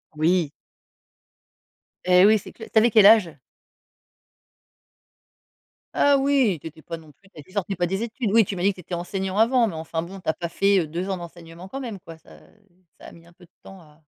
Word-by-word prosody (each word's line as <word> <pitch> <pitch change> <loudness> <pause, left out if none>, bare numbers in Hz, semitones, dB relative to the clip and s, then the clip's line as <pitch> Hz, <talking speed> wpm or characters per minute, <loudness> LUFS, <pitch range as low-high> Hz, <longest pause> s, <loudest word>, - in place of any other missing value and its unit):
Oui! 160 -1 +1 1.5
Et 180 +1 +5
oui, 215 0 +5
c'est - - -12
cl 225 - -12
tu - - 0
avais 230 +1 +3
quel 215 -2 +6
âge? 200 -8 +5 2.6
Ah 285 -1 +3
oui, 270 - +2
tu 160 - -9
étais 160 0 -13
pas 165 - -7
non 155 -2 -16
plus 195 +7 -26
tu 185 - -22
sortais 200 -1 -3
pas 175 0 0
des 195 +5 -2
études. 230 -2 -3
Oui, 225 0 +5
tu 195 - -5
m'as 175 - -5
dit 200 +2 +3
que - - -12
tu 180 - -12
étais 175 - -10
enseignant 190 +3 -4
avant, 235 +1 +3
mais, 185 - -5
enfin 160 0 -4
bon, 190 +3 -9
tu - - -18
as - - +2
pas 170 -1 -6
fait, 195 +2 +2
heu, 160 - -2
2 175 +5 -5
ans 190 - -2
d'enseignement 170 +1 -11
quand 270 - -6
même, 225 -7 -7
quoi. 165 -1 -13
Ça - - -18 0.6
ça - - -12
a - - -12
mis 170 0 -17
un 170 - -20
peu 175 0 -19
de 175 - -33
temps 195 -1 -13
à 155 -1 -21
185 Hz, 225 wpm, -23 LUFS, 170-210 Hz, 2.6 s, quel